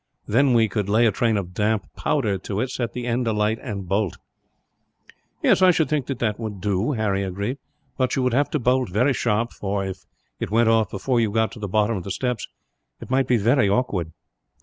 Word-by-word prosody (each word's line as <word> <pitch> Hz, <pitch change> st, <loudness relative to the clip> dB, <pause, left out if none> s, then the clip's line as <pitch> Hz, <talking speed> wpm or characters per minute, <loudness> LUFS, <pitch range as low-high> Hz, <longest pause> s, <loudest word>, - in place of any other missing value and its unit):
Then 125 Hz, +3 st, +3 dB
we 115 Hz, -1 st, +4 dB
could 105 Hz, -1 st, -2 dB
lay 110 Hz, +3 st, +4 dB
a 110 Hz, -, +4 dB
train 110 Hz, +1 st, +1 dB
of 90 Hz, -2 st, -4 dB
damp 105 Hz, +2 st, 0 dB
powder 100 Hz, -2 st, 0 dB
to 100 Hz, +2 st, -4 dB
it, 130 Hz, +3 st, -1 dB
set 120 Hz, -3 st, -3 dB
the 125 Hz, -1 st, -4 dB
end 120 Hz, 0 st, 0 dB
alight, 110 Hz, 0 st, +1 dB
and 100 Hz, -3 st, -5 dB
bolt." 100 Hz, 0 st, 0 dB, 1.3 s
"I 185 Hz, 0 st, +5 dB
should 160 Hz, -3 st, +2 dB
think 150 Hz, -4 st, -1 dB
that 135 Hz, -, -3 dB
that 110 Hz, -3 st, -1 dB
would 110 Hz, -4 st, -5 dB
do," 100 Hz, +7 st, 0 dB
Harry 105 Hz, -4 st, 0 dB
agreed, 100 Hz, +8 st, -3 dB, 0.4 s
"but 130 Hz, 0 st, +1 dB
you 130 Hz, -, 0 dB
would 125 Hz, -2 st, +1 dB
have 140 Hz, +3 st, +2 dB
to -, -, 0 dB
bolt 125 Hz, -1 st, +1 dB
very 125 Hz, +9 st, +2 dB
sharp 115 Hz, -1 st, 0 dB
for, 100 Hz, -1 st, -2 dB
if 95 Hz, -1 st, -6 dB, 0.4 s
it -, -, -3 dB
went 115 Hz, +2 st, +3 dB
off 110 Hz, -3 st, +3 dB
before 120 Hz, +6 st, 0 dB
you 115 Hz, -2 st, +2 dB
got 110 Hz, +1 st, +1 dB
to 120 Hz, -, -10 dB
the 105 Hz, -, -4 dB
bottom 105 Hz, +2 st, +1 dB
of 90 Hz, -, -5 dB
the 100 Hz, -, -7 dB
steps, 125 Hz, +2 st, -2 dB, 0.5 s
it 115 Hz, -, -10 dB
might 130 Hz, -1 st, +2 dB
be 125 Hz, -, +3 dB
very 115 Hz, 0 st, +3 dB
awkward." 100 Hz, -7 st, 0 dB
110 Hz, 215 wpm, -23 LUFS, 100-125 Hz, 1.3 s, I